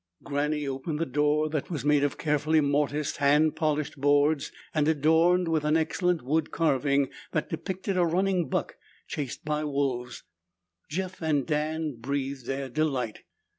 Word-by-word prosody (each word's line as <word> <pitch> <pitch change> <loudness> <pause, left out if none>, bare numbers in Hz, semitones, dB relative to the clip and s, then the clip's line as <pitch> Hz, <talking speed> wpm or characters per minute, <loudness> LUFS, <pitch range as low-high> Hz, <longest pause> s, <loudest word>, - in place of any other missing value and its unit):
Granny 145 +1 -1
opened 135 +3 -3
the 165 - 0
door 150 +2 +1
that 155 -2 -3
was 150 -6 -4
made 145 -1 +4
of 145 - 0
carefully 155 +1 +2
mortised, 145 0 0
hand 150 +2 +3
polished 150 -2 -1
boards 145 +1 +3 0.2
and 155 -1 +2
adorned 160 +4 +3
with 160 -2 +1
an 150 +1 +3
excellent 175 +1 0
wood 155 +4 0
carving 140 -3 +1 0.2
that 155 - -1
depicted 190 +3 -3
a 180 - +4
running 180 +1 +1
buck - - -2 0.3
chased 140 -2 -5
by 150 0 -1
wolves. 135 -4 -2 0.7
Jeff 185 +3 -4
and 150 -4 +1
Dan 155 -2 -1
breathed 135 0 -3
their 135 0 -2
delight. 130 -5 -1
150 Hz, 150 wpm, -27 LUFS, 140-160 Hz, 0.7 s, made